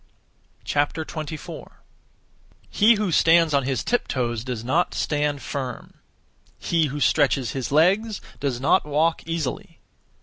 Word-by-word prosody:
24. 155 +1 -4 0.9
He 225 +3 +5
who 205 -3 -1
stands 165 -1 +4
on 140 - +3
his 130 -1 -1
tiptoes 120 - -1
does 125 -3 -5
not 160 +9 0
stand 145 -3 -1
firm; 130 -2 -5 0.6
he 165 -2 +1
who 145 +2 -5
stretches 140 -5 +2
his 130 -2 -4
legs 195 +8 +2 0.2
does 135 -4 -2
not 135 - +3
walk 155 +3 +1
(easily). 165 -6 -4
150 Hz, 115 wpm, -23 LUFS, 135-165 Hz, 0.9 s, He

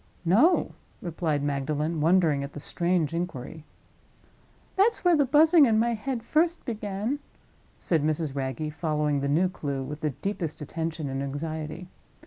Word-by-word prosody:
"No," 240 - +4 0.3
replied 160 -4 -2
Magdalen, 150 +3 -1
wondering 160 -4 +3
at 140 - -7
the - - -7
strange 170 0 0
inquiry. 160 -3 -5 1.1
"That's 400 +1 +2
where 350 -1 +6
the 290 -2 +3
Buzzing 310 +2 +6
in 220 -2 +3
my 235 +2 +2
head 230 +1 -3
first 330 +7 +1
began," 215 +3 -3 0.6
said 165 -4 0
Mrs. 155 -1 -1
Wragge, 140 +3 -3
following 150 -3 0
the 140 - -1
new 165 +6 +3
clue 140 -6 -4
with 150 +3 -7
the 155 - +1
deepest 165 +2 -4
attention 160 0 -4
and 135 0 -3
anxiety. 155 +4 -5
165 Hz, 145 wpm, -27 LUFS, 150-215 Hz, 1.1 s, where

